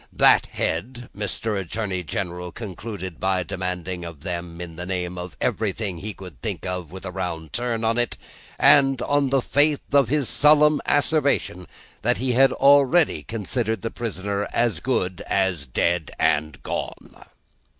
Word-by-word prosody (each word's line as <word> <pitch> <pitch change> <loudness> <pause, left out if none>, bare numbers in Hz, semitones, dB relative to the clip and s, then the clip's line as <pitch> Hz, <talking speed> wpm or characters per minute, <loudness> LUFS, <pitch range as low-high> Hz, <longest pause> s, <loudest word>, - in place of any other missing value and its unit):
That - - +5
head 120 +9 -3
Mr. 105 0 -2
Attorney 95 0 -3
General 90 +1 -4
concluded 95 -4 -7
by 95 -1 +1
demanding 90 0 -4
of 85 -4 -9
them, 85 -1 -5
in 85 -2 -7
the 90 +2 -6
name 90 -1 -3
of 90 0 -8
everything 100 -4 -1
he 105 +4 -4
could 90 -9 -12
think - - -4
of 90 -3 -4
with 95 +1 -9
a 90 - -4
round 85 -4 -4
turn 120 -2 -1
in 115 +1 +1
it, 120 - -1 0.4
and 135 -3 +6
on 145 -1 +2
the 135 -1 +2
faith 145 +1 +2
of 140 -5 +5
his 145 -2 +1
solemn 150 +4 +5
asseveration 145 - +1 0.3
that 120 +2 +2
he 125 -1 0
already 140 - +5
considered 110 - -2
the 115 - -2
prisoner 100 -3 -3
as 120 -1 +1
good 95 -8 -1
as 95 -7 0
dead 85 +6 0
and 75 -1 0
gone. - - -6
100 Hz, 150 wpm, -23 LUFS, 90-120 Hz, 0.4 s, and